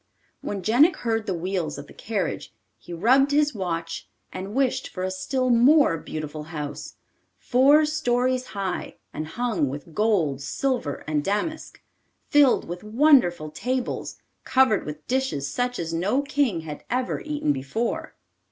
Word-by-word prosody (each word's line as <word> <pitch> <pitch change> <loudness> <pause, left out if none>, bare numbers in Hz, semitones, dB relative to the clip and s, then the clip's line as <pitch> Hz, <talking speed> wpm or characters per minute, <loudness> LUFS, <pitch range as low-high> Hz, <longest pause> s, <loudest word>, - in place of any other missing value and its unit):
When 200 -2 -4
Jenik 280 - +5
heard 225 -4 -2
the 190 - 0
wheels 175 -3 -2
of - - -8
the - - -15
carriage, - - -3 0.3
he - - -13
rubbed 250 +11 +4
his 295 0 +2
watch 165 -5 -4 0.2
and 195 +4 -6
wished 265 -2 0
for 185 - -5
a 185 - -1
still 255 +7 -1
more 255 - +5
beautiful 155 -1 -6
house, 150 -3 -6 0.4
four 280 +5 +4
stories 255 -4 0
high, 190 -2 -3 0.2
and 155 - -4
hung 210 - -1
with 145 +4 -8
gold, 175 -11 +1
silver, 240 - -2
and 150 -1 0
damask; 210 - -3 0.5
filled 290 -3 +4
with 175 +3 -6
wonderful 215 - +3
tables, 250 +9 -3 0.3
covered 260 -9 +3
with 150 0 -7
dishes 260 - -1
such 245 - -2
as 165 -1 -4
no 205 +12 +1
king 275 - 0
had 150 -2 -8
ever 250 +1 -1
eaten 295 - -1
before. 140 - -3
215 Hz, 145 wpm, -25 LUFS, 165-260 Hz, 0.5 s, Jenik